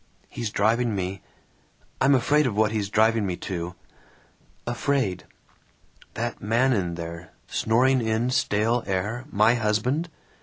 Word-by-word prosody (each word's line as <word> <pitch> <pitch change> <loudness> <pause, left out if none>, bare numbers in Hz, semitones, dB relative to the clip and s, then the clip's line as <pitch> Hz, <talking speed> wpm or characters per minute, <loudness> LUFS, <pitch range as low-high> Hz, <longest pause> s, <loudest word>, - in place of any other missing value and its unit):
He's 115 -2 -4
driving 110 +2 +1
me 95 0 -3 0.8
I'm 135 +1 +5
afraid 145 +4 +3
of 110 - -2
what 110 -1 +3
he's 105 -3 -2
driving 110 +1 +3
me 90 -3 -2
to. 90 -1 -4 0.9
Afraid. 120 -4 -1 0.9
"That - - -3
man 120 +6 +2
in 90 -6 -1
there, 85 +1 -8
snoring 130 +3 +2
in 115 +2 0
stale 120 -2 +1
air, 105 +6 -2
my 110 +3 +4
husband? 120 +8 0
110 Hz, 125 wpm, -25 LUFS, 100-125 Hz, 0.9 s, I'm